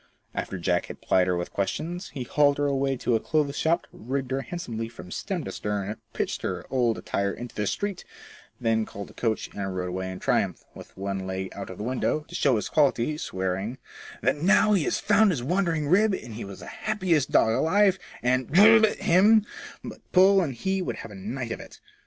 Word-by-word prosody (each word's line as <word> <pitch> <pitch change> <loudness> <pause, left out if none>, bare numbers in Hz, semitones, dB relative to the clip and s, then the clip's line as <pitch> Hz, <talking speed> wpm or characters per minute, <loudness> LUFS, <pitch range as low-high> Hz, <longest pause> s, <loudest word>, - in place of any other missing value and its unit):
After 95 - -4
Jack 90 0 0
had - - -9
plied 90 -1 +2
her 90 -1 +1
with 85 - -5
questions, 165 - -3
he 135 -3 -5
hauled 145 +2 +3
her 145 - +1
away 135 -1 0
to 120 - 0
a - - +2
clothes 145 +2 0
shop, 165 +3 +1
rigged 130 +3 -4
her 135 +1 0
handsomely 115 -9 -5
from 90 -6 -11
stem - - -3
to - - -5
stern, 105 0 -3 0.2
pitching - - -2
her - - -5
old 120 -4 +2
attire 100 0 -1
into 120 +3 -8
the 105 -1 -2
street, 200 - -2 0.6
then 115 -2 +1
called 100 -1 -8
a - - -18
coach 110 -2 -2
and 95 -2 -4
rode 90 0 -2
away 95 +1 -3
in 95 - -6
triumph, - - 0
with - - -13
one 95 -1 -3
leg 95 0 -3
out 100 - -7
of 95 - -8
the - - -5
window, 130 +5 0
to - - -13
show 135 -4 +3
his 105 - -1
quality, 145 -1 +2
swearing 95 -2 -3 0.5
"that, 130 +5 +2
now 195 +6 +4
he 180 -7 +2
had - - 0
found 210 +1 +4
his 145 -10 -1
wandering 165 -1 0
rib, 200 +5 +4
he 115 -7 -7
was 100 -1 -9
the - - -9
happiest 185 - 0
dog 110 - +4
alive, 190 - +3 0.2
and 130 0 +1
d 220 +4 +7
him, 205 +5 +4 0.4
but - - -8
Poll 190 +1 +6
and 140 -8 -2
he 190 +10 -1
would - - -3
have 115 - -9
a - - -10
night 115 +5 -5
of - - -4
it." - - -12
130 Hz, 210 wpm, -26 LUFS, 100-170 Hz, 0.6 s, d